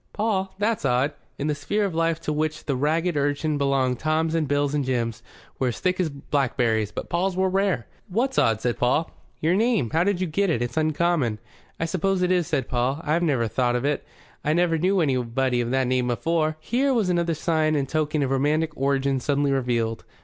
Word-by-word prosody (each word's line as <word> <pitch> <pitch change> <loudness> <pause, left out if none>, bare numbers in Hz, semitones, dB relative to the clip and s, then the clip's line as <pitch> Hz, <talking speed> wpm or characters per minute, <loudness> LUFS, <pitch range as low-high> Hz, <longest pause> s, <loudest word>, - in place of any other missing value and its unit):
"Paul? 205 -3 -1
That's 215 +2 0
odd." 135 +2 +1 0.2
In 140 - -3
the 150 - +1
sphere 205 +9 -1
of 195 - -3
life 165 0 +1
to 150 - -2
which 155 +1 -2
the 140 - 0
ragged 160 +5 0
urchin 145 +1 0
belonged 135 -3 +1
Toms 160 +1 0
and 160 -3 0
Bills 145 0 +1
and 145 -1 +1
Jims 120 -3 -2 0.4
were 130 - +1
as 120 - -3
thick 185 0 0
as 175 -3 +1
blackberries, 125 -6 0
but - - -5
Pauls 180 +2 -1
were 190 0 +2
rare. 190 - +1 0.2
"What's 240 +7 0
odd?" 110 -1 +2
said 120 0 -1
Paul. 130 +6 +1 0.3
"Your 160 +3 +2
name. 215 - +1
How 165 +2 +3
did 195 -1 0
you 185 - 0
get 190 +4 0
it? 155 - +1
It's 120 - -4
uncommon." 155 -6 +1 0.4
"I 165 - 0
suppose 185 +2 0
it 180 - +2
is," 180 -3 +2
said 140 -4 -1
Paul. 125 +3 0
"I 155 +3 +1
never 140 -9 +1
thowt 120 +2 0
of 125 +2 -1
it. 145 0 0 0.4
I 150 - +1
never 170 -1 +2
knew 185 +2 +2
anybody 130 -3 +1
of 120 - -2
that 130 +1 +1
name 125 0 0
afore." 155 +4 0
Here 260 - +1
was 215 -6 +1
another 170 -2 +1
sign 155 -1 +1
and 140 -2 0
token 155 0 0
of 135 - -1
romantic 150 +4 +1
origin 135 0 +1
suddenly 140 +2 +1
revealed. 120 -4 0
150 Hz, 210 wpm, -24 LUFS, 130-175 Hz, 0.4 s, How